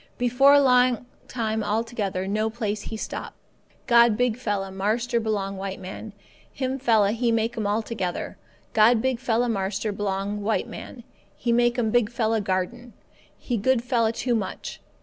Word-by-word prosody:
"Before 270 +4 +5
long 250 -3 +3 0.2
time 220 -3 -2
altogether 210 -3 -2
no 215 +2 0
place 215 -2 -3
he 220 - -6
stop. - - -6 0.5
God 235 -3 +5
big 245 -2 +1
fella 205 -5 -3
marster 225 +5 0
belong 200 -3 -2
white 195 0 -5
man, 195 +3 -8 0.4
him 260 0 -3
fella 220 -5 +3
He 235 +1 0
make 225 0 0
'm 215 -2 -2
altogether. 210 -3 -2 0.4
God 220 +2 +5
big 260 0 0
fella 240 -1 +1
marster 210 0 -1
belong 200 0 -2
white 215 +2 0
man, 240 - -9 0.3
He 235 - -1
make 240 +1 +3
'm 225 -3 +1
big 240 -3 +3
fella 225 -2 0
garden. 205 +6 -3 0.4
He 245 - -2
good 240 +3 +2
fella 235 -3 +1
too 240 +2 -1
much. 215 -4 -4
225 Hz, 155 wpm, -25 LUFS, 205-240 Hz, 0.5 s, Before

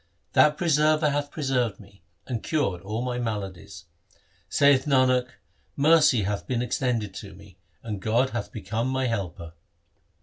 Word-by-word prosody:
That 150 0 +5
Preserver 155 -1 +2
hath 145 0 -2
preserved 130 -8 -1
me, 100 -2 -17 0.2
and 120 -4 -4
cured 120 - -1
all 110 +5 -4
my 125 -1 -2
maladies. 105 -6 -5 0.6
Saith 140 -2 +4
Nanak, 130 -3 +3 0.5
mercy 150 -6 +4
hath 100 +1 -3
been 125 -1 -1
extended 120 -5 -1
to 100 -1 -9
me, 95 -1 -17 0.2
and 105 -4 -5
God 120 +6 +1
hath 120 -3 -4
become 110 +3 -3
my 130 0 -1
helper. 90 -8 -4
120 Hz, 140 wpm, -25 LUFS, 105-140 Hz, 0.6 s, That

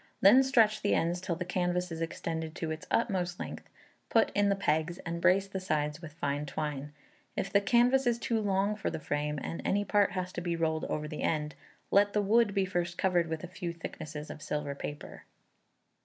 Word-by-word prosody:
Then 215 +7 +8
stretch 230 -5 +3
the 205 - +2
ends 175 +2 0
till 185 -3 -2
the 180 +2 -4
canvas 180 0 -1
is 165 0 -5
extended 160 -1 -3
to 160 -2 -3
its 160 0 -6
utmost 185 -6 0
length, - - -7 0.4
put 225 - +3
in 205 0 +3
the 200 - +3
pegs, 165 -2 0
and 170 0 -3
brace 195 +2 +4
the 195 -1 -4
sides 150 -3 -1
with 160 -3 -9
fine 145 -1 -2
twine. 145 0 -4 0.5
If 195 - -2
the 200 - +5
canvas 245 +5 +4
is 235 -1 +3
too 230 -1 0
long 200 0 +1
for 210 - -2
the 160 - -4
frame, 150 0 -2
and 165 - -4
any 205 +1 +1
part 205 -2 +3
has 185 -1 -3
to 175 - -4
be 170 -1 -1
rolled 160 -1 0
over 150 0 -2
the 150 0 -6
end, 150 -1 0 0.4
let 200 +1 +4
the 210 - +3
wood 210 0 +3
be 195 -1 +3
first 175 -1 -2
covered 175 -3 +2
with 160 0 -4
a - - -4
few 175 0 -5
thicknesses 155 -2 -7
of - - -9
silver 150 -1 -3
paper. 145 +1 -7
175 Hz, 210 wpm, -31 LUFS, 155-200 Hz, 0.5 s, Then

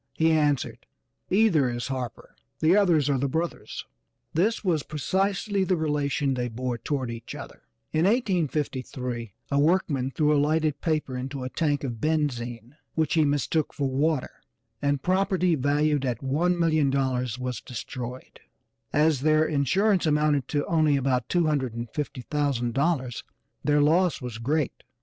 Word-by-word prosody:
He 160 0 +3
answered, 150 -4 0 0.4
"Either 185 - +4
is 120 +2 -4
Harper, 130 -3 -5 0.2
the 160 +4 +4
others 175 -8 +4
are 140 -2 +1
the 140 +1 0
brothers." 165 +5 -3 0.5
This 210 +9 +1
was 170 -6 +1
precisely 195 +7 0
the 185 -1 +1
relation 145 -3 0
they 125 -1 -1
bore 120 +1 -3
toward 130 -4 -2
each 115 -1 -7
other. - - -10 0.3
In 155 +2 +3
1853 140 - -1 0.2
a 140 - +3
workman 145 -5 +2
threw 150 +2 +2
a 145 - +3
lighted 155 -1 +1
paper 155 -5 -1
into 130 +1 -4
a 130 - -3
tank 145 -3 0
of 120 -5 -4
benzine 125 -5 -2 0.2
which 160 -2 +1
he 160 - +4
mistook 145 +2 0
for 140 - 0
water, 145 +1 0 0.5
and 140 -1 0
property 185 -1 +2
valued 145 0 +1
at 125 -4 -1
$1,000,000 140 -5 +1
was 125 -2 -4
destroyed; 125 0 -7 0.5
as 150 -2 +3
their 155 +1 +4
insurance 175 - +2
amounted 150 -3 +2
to 145 -1 -1
only 155 -3 +3
about 130 -2 0
$250,000 135 -1 -1 0.4
their 150 0 +3
loss 170 +4 +3
was 125 -4 -6
great. 145 +5 -1
145 Hz, 135 wpm, -26 LUFS, 130-160 Hz, 0.5 s, Either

